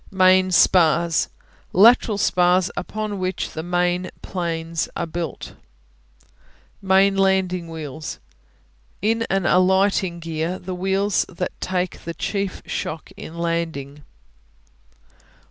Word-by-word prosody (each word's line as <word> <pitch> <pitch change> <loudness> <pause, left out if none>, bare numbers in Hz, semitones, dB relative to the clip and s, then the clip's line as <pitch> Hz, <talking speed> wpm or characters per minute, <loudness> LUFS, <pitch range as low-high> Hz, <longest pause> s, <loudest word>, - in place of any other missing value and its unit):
Main 185 -1 +4
Spars 170 -3 +3 0.4
Lateral 220 +1 +5
spars 180 -1 +2
upon 210 +1 -4
which 185 0 -2
the 160 - -5
main 175 +1 0
planes 165 -2 -3
are 170 - -2
built. 165 -1 -5 1.3
Main 195 +1 +4
Landing 190 -2 +1
Wheels 155 -2 -6 0.9
In 225 +2 +1
an 195 -2 0
alighting 190 -1 +2
gear, 165 +2 -3
the 185 +1 -6
wheels 195 +2 +1
that 180 0 -4
take 180 -1 -2
the 170 0 -6
chief 200 -2 -3
shock 155 0 -5
in 165 - -9
landing. 165 -4 -3
180 Hz, 105 wpm, -22 LUFS, 170-190 Hz, 1.3 s, Lateral